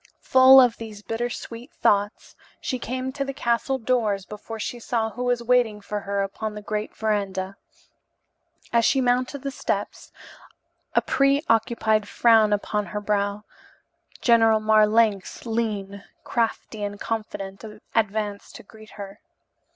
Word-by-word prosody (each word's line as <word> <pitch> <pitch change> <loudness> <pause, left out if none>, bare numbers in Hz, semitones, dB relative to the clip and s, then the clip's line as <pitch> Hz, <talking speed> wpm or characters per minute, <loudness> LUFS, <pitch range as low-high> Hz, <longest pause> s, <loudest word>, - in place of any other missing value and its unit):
Full 260 +1 +8
of 245 -3 +4
these 215 -2 -9
bitter 235 +3 -2
sweet 240 +3 -8
thoughts 205 -6 0 0.2
she 255 -3 -3
came 255 +2 -4
to 275 +1 -3
the 275 -1 -5
castle 250 +1 0
doors 220 -5 0
before 210 +2 -8
she 240 +3 -4
saw 225 -2 -1
who 245 +4 -5
was 245 -1 0
waiting 235 -3 +2
for 210 0 -4
her 200 0 -2
upon 210 +2 -5
the 210 - -7
great 210 +1 -4
verandah. 200 -3 -2 1.2
As 235 0 +4
she 270 - +3
mounted 255 +2 0
the 275 - -3
steps, - - -4 0.8
a - - +4
preoccupied 230 -6 +2
frown 225 -2 +4
upon 210 0 -1
her - - -11
fair 205 - -14
brow, 205 0 0 0.8
General 225 -2 +5
Marlanx, 215 -1 +2
lean, 210 -4 -3 0.2
crafty 225 -2 -2
and 205 0 -4
confident, 205 -3 -5 0.3
advanced 210 -2 -2
to - - -10
greet 215 +1 -16
her. 200 0 -8
220 Hz, 140 wpm, -24 LUFS, 205-240 Hz, 1.2 s, Full